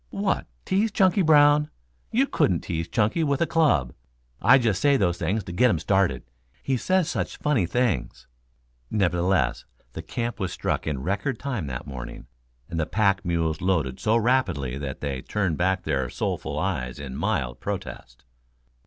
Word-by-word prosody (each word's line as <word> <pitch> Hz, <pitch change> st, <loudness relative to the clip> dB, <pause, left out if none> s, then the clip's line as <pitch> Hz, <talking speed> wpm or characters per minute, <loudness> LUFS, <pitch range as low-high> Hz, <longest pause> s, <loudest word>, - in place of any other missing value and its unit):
"What, -, -, -1 dB, 0.2 s
tease 210 Hz, +4 st, +1 dB
Chunky 195 Hz, -1 st, +3 dB
Brown? 150 Hz, -2 st, +5 dB, 0.4 s
You 260 Hz, +5 st, +2 dB
couldn't 90 Hz, -, +1 dB
tease 80 Hz, -2 st, -3 dB
Chunky 115 Hz, -, +1 dB
with 140 Hz, -2 st, +1 dB
a 170 Hz, -, +3 dB
club. 140 Hz, -, +2 dB, 0.5 s
I 130 Hz, +6 st, +7 dB
just 110 Hz, -7 st, 0 dB
say 140 Hz, -1 st, +4 dB
those 90 Hz, -5 st, 0 dB
things 105 Hz, +2 st, -1 dB
to -, -, -8 dB
get 125 Hz, +9 st, +4 dB
him 85 Hz, -, +2 dB
started. 95 Hz, +2 st, +1 dB, 0.4 s
He 135 Hz, -, 0 dB
says 185 Hz, +6 st, +1 dB
such -, -, -3 dB
funny 135 Hz, -, +1 dB
things." 120 Hz, -1 st, -1 dB, 0.6 s
Nevertheless, 90 Hz, -2 st, +1 dB, 0.3 s
the 80 Hz, -, -5 dB
camp 115 Hz, +7 st, -4 dB
was 95 Hz, -3 st, -2 dB
struck -, -, -2 dB
in 70 Hz, -4 st, -2 dB
record 100 Hz, -, -1 dB
time 120 Hz, -, -3 dB
that 65 Hz, -2 st, -5 dB
morning, 60 Hz, -4 st, -8 dB, 0.4 s
and 85 Hz, -, -4 dB
the 80 Hz, -, 0 dB
pack 100 Hz, -2 st, +1 dB
mules 85 Hz, -3 st, -1 dB
loaded 80 Hz, -9 st, 0 dB
so 110 Hz, +2 st, +2 dB
rapidly 95 Hz, -, +1 dB
that 70 Hz, -1 st, -6 dB
they 70 Hz, -3 st, -3 dB
turned 95 Hz, -4 st, -1 dB
back 95 Hz, +1 st, +1 dB
their 70 Hz, -6 st, -1 dB
soulful -, -, -3 dB
eyes 60 Hz, +1 st, -2 dB
in 70 Hz, -2 st, -7 dB
mild -, -, -1 dB
protest. -, -, -6 dB
95 Hz, 165 wpm, -25 LUFS, 80-130 Hz, 0.6 s, I